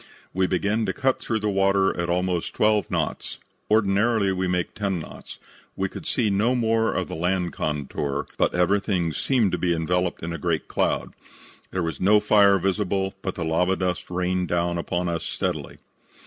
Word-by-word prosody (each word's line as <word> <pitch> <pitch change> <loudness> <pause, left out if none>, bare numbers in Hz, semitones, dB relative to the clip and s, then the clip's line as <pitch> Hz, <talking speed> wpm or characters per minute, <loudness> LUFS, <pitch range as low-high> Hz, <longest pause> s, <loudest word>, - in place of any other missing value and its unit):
"We 95 0 +2
began 100 +4 0
to - - 0
cut 135 -2 +1
through 110 -2 -2
the 105 - 0
water 95 0 +2
at 85 0 -2
almost 90 -1 -1
twelve 105 -1 +2
knots. - - -2 0.3
Ordinarily 105 0 +3
we 95 0 -1
make 90 -1 -1
ten 100 -3 -1
knots. 80 - -10 0.4
We 95 0 -1
could - - -8
see 110 -5 +1
no 110 +6 +2
more 115 -2 +2
of 95 - -2
the - - -7
land 90 +1 -1
contour, 70 -1 -2
but - - +1
everything 90 -2 +1
seemed 115 - +1
to - - -1
be 85 -2 +1
enveloped 90 +2 -1
in 85 0 -3
a 85 - -5
great 85 -3 -1
cloud. - - -1 0.6
There 95 -2 -2
was 80 -4 -4
no 105 +3 +5
fire 100 -1 +5
visible, 95 0 0
but 95 - -3
the 85 - -3
lava 90 +4 +2
dust 90 -2 -2
rained 90 0 -1
down 85 +1 0
upon 90 +1 -2
us 85 -1 -2
steadily. - - -3
95 Hz, 180 wpm, -24 LUFS, 85-100 Hz, 0.6 s, no